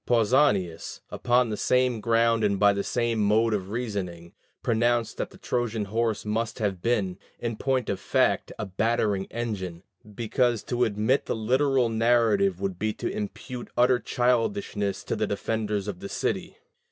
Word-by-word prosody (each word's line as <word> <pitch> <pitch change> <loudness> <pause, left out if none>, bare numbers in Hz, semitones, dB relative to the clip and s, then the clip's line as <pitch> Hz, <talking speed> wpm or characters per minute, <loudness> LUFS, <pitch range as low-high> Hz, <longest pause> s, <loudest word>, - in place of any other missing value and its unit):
Pausanias, 110 - +2
upon 120 -1 +2
the - - -1
same 125 -1 +1
ground 115 0 +3
and 100 -2 +1
by 100 -1 +5
the 100 0 -2
same 120 -1 0
mode 110 +2 +3
of 95 -2 -2
reasoning, 100 -7 -4 0.3
pronounced 120 0 +1
that - - -3
the - - -15
Trojan 115 -3 -1
horse 110 +2 -1
must 110 +2 -2
have 100 -6 -2
been, 100 -5 0 0.2
in 120 -1 -3
point 130 0 0
of 95 - -2
fact, - - +1
a - - -3
battering 100 0 0
engine, 95 -7 -4 0.3
because 120 +1 +1
to 125 0 +1
admit 110 +5 +1
the - - 0
literal 130 +3 +2
narrative 110 -5 +2
would 95 -2 -3
be 110 +1 0
to - - -3
impute 120 +4 -5
utter 125 +1 +4
childishness 120 - 0
to - - -2
the - - -1
defenders 105 -3 -2
of 95 -4 -4
the 100 - -7
city. - - -2
110 Hz, 160 wpm, -26 LUFS, 100-120 Hz, 0.3 s, by